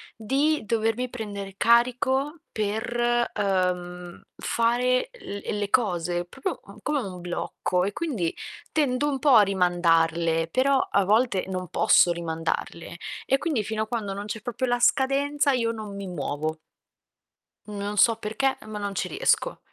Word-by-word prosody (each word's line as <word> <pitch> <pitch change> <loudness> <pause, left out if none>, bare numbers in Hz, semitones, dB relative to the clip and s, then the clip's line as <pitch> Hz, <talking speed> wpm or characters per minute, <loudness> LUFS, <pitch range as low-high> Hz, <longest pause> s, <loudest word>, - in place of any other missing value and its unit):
di 275 +6 +1
dovermi 225 +3 0
prendere 205 -5 -6
carico 255 +7 +2
per, 240 +3 0
uhm, 180 -3 -1
fare 250 - +1
l 205 - -7
ehm, 210 - -2
le 205 -1 -2
cose, 175 -6 0
proprio, 270 - -5
mhmm, - - -13
come 300 -1 0
un 185 -5 -7
blocco, 180 +1 -2
e 200 - -1
quindi 230 - -2 0.4
tendo 290 -2 +1
un 275 -2 -1
po' 275 -2 +5
a 215 - +8
rimandarle, 170 -3 +2
però 265 +7 +3
a 200 - +1
volte 215 -1 +2
non 185 -1 -4
posso 175 - +5
rimandarle, 170 0 -3 0.3
e 270 - +3
quindi 275 -7 -1
fino 220 +1 -2
a - - -7
quando 215 -3 -3
non 200 +1 -5
c'è 215 +1 -5
proprio 245 +2 -2
la 245 -1 +1
scadenza 280 +3 +2
io 235 -3 +1
non 215 -3 -7
mi 200 -1 -6
muovo. 155 -2 -3 1.1
Mhmm, 210 -1 -7
non 205 +1 -4
so 230 +2 +6
perché, 225 +5 -1
ehm, - - -12
ma 210 -1 -5
non 200 -1 -4
ci - - -1
riesco. - - +1
215 Hz, 160 wpm, -25 LUFS, 180-250 Hz, 1.1 s, a